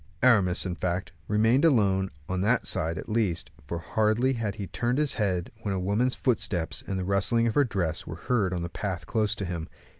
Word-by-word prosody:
Aramis, 100 -8 +4
in 90 - -2
fact, 90 +1 -2 0.2
remained 110 +6 +3
alone, 100 - +3 0.2
on 90 0 -1
that 115 +5 +2
side 80 +1 0
at - - -6
least; 105 -6 -1 0.2
for 85 - -3
hardly 110 +8 +1
had 110 -4 -2
he 100 - -4
turned 120 +6 -1
his 150 -1 +1
head 95 -5 -1
when 100 -3 -2
a - - -1
woman's 105 +7 +1
footsteps, 100 -9 -1
and 95 - -2
the 95 - -2
rustling 100 +4 +2
of 115 - +1
her 145 - +4
dress, 90 - -2
were - - -5
heard 105 -7 0
in 90 -2 -2
the - - -2
path 95 0 -4
close 110 -1 0
to 100 - -4
him. 85 -2 -4
100 Hz, 210 wpm, -27 LUFS, 90-115 Hz, 0.2 s, Aramis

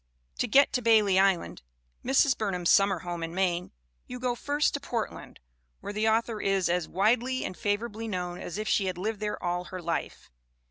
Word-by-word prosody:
To 245 - +1
get 275 +5 +5
to 250 - +1
Bailey 215 -5 +4
Island, 195 -3 +1 0.4
Mrs. 270 +1 +3
Burnham's 180 -5 0
summer 195 -3 +4
home 175 -2 -5
in 165 +1 -5
Maine, 180 -2 0 0.4
you 250 - -7
go 250 0 0
first 290 +4 0
to 285 - -2
Portland, 235 -5 -5 0.4
where 205 - -6
the 215 +1 +1
author 225 0 0
is 195 -3 +1
as 175 -1 0
"widely 240 +7 +1
and 185 - -5
favorably 215 +3 -2
known" 180 -3 -4
as 170 - -6
if 215 0 -3
she 200 - +2
had 185 -1 -3
lived 210 +3 -3
there 210 -1 -2
all 175 0 -1
her 185 - -7
life. 170 - -4
205 Hz, 190 wpm, -28 LUFS, 180-230 Hz, 0.4 s, get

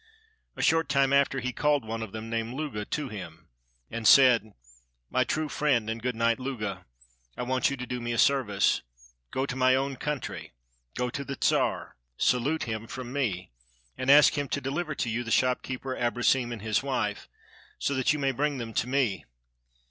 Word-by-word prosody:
A - - -3
short 165 -1 +3
time 140 0 +3
after 140 -1 +3
he 125 +1 -2
called 145 -4 +1
one 115 +1 -4
of 110 -3 -5
them, 110 +1 -6
named 115 +1 -3
Luga, 135 -9 -4
to 150 +3 -3
him, 90 -7 -9 0.4
and 115 -1 -1
said— 125 -5 +6 0.6
"My - - +3
true 155 0 -1
friend 130 -7 +1
and 115 0 -5
good 125 0 -2
knight 115 +2 +1
Luga, 105 -8 -4 0.5
I - - -2
want 130 +2 +1
you 140 - -4
to 125 - -5
do 125 0 -4
me 120 0 -3
a 115 - -1
service. 120 -9 +3 0.5
Go 130 - -1
to 125 - -4
my 130 0 +4
own 135 +1 -1
country, 95 - -4 0.4
go 125 -1 -1
to 140 - -4
the 140 -1 -6
Czar, - - 0 0.2
salute 140 +6 +1
him 110 -1 -4
from 125 +1 -7
me, 100 - -2 0.4
and 130 - -3
ask 145 +1 +7
him 145 -1 -1
to - - -1
deliver 150 +4 -3
to 125 - -2
you 115 +2 -1
the 115 - -7
shopkeeper 130 +1 0
Abrosim 120 +1 +1
and 110 -3 -6
his 110 -1 +1
wife, 125 -7 -2 0.5
so 140 - -1
that 130 -2 +2
you 150 - 0
may 135 -2 +1
bring 145 +2 -1
them 115 -2 -6
to 120 - 0
me. 125 - 0
125 Hz, 195 wpm, -28 LUFS, 115-140 Hz, 0.6 s, ask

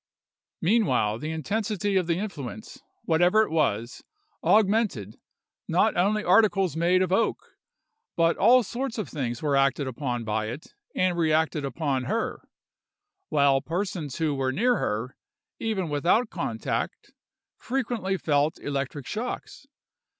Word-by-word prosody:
Meanwhile, 170 - +2
the 155 - -4
intensity 205 - -2
of 185 -3 +2
the 170 -1 +1
influence, 170 - -6 0.2
whatever 175 +6 +4
it - - -5
was, 120 -7 -1 0.4
augmented; 205 - +2 0.5
not - - +2
only 205 +4 +2
articles 190 -3 +3
made 175 +3 +3
of 185 - -2
oak, 395 - 0 0.6
but 165 0 +3
all 245 +5 +5
sorts 245 +3 -4
of 215 - -3
things 120 -4 -4
were 145 -2 +1
acted 135 +1 +2
upon 125 -2 -3
by 110 0 -1
it 125 +8 -8 0.2
and 180 -2 +1
reacted 160 -1 +1
upon 135 -1 -2
her, - - -2 0.9
while 140 -2 +3
persons 170 - -3
who 160 -3 0
were 135 -1 -1
near 240 - +2
her, 115 +5 -2 0.4
even 210 -6 -1
without 170 - +1
contact, - - -3 0.5
frequently 235 -7 -2
felt 150 -1 +1
electric 140 -1 -4
shocks. 245 - -5
165 Hz, 130 wpm, -26 LUFS, 140-205 Hz, 0.9 s, all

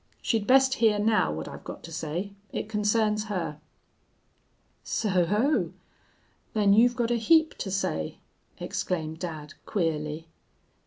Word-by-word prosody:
She'd 220 -4 0
best 265 0 +6
hear 220 -2 +5
now 210 - +2
what 80 +1 -5
I've - - -9
got - - -8
to 165 - -9
say. 165 +5 -3 0.2
It - - -3
concerns 210 0 +1
her.' 170 -8 -3 1.2
"'So 185 -5 +1
ho! 235 - +1 0.8
Then 205 -2 +4
you've 240 +3 +5
got 240 -1 0
a 240 - +2
heap 315 +8 +4
to 195 - -3
say?' 80 - -2 0.4
exclaimed 160 -3 -3
dad, 155 -4 -6
queerly. 160 -3 -2
205 Hz, 130 wpm, -27 LUFS, 160-225 Hz, 1.2 s, best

